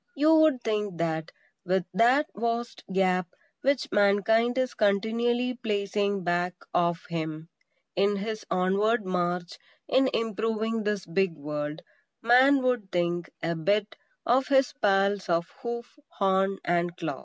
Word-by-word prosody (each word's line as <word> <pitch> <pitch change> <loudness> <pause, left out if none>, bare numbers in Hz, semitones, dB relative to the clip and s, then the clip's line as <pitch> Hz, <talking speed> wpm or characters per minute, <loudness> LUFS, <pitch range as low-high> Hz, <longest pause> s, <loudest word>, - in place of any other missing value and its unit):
You 310 +3 +4
would 315 -5 +4
think 210 -4 -2
that, 160 -1 -2 0.3
with 185 -1 0
that 245 +9 +4
vast 235 +2 -3
gap 185 -1 +1 0.3
which 275 -1 0
Mankind 225 +4 +3
is 255 -1 0
continually 235 +4 +1
placing 200 -4 -1
back 175 +1 0 0.2
of 170 -1 +1
him 160 -1 -5 0.5
in 200 +2 +2
his 215 +2 -4
onward 200 +5 +1
march 180 -1 -2 0.3
in 265 0 +3
improving 225 0 -1
this 210 -2 -1
big 170 +1 0
world, 150 +2 -5 0.4
Man 260 +3 +5
would 245 -6 0
think, 175 -1 -1
a 170 - 0
bit, 200 +6 0 0.3
of 260 +2 +2
his 270 -2 +3
pals 200 -1 +2
of 170 0 +2 0.2
hoof, 235 +4 -6
horn 195 0 +1
and 175 0 0
claw. 145 -5 -4
200 Hz, 130 wpm, -27 LUFS, 175-235 Hz, 0.5 s, Man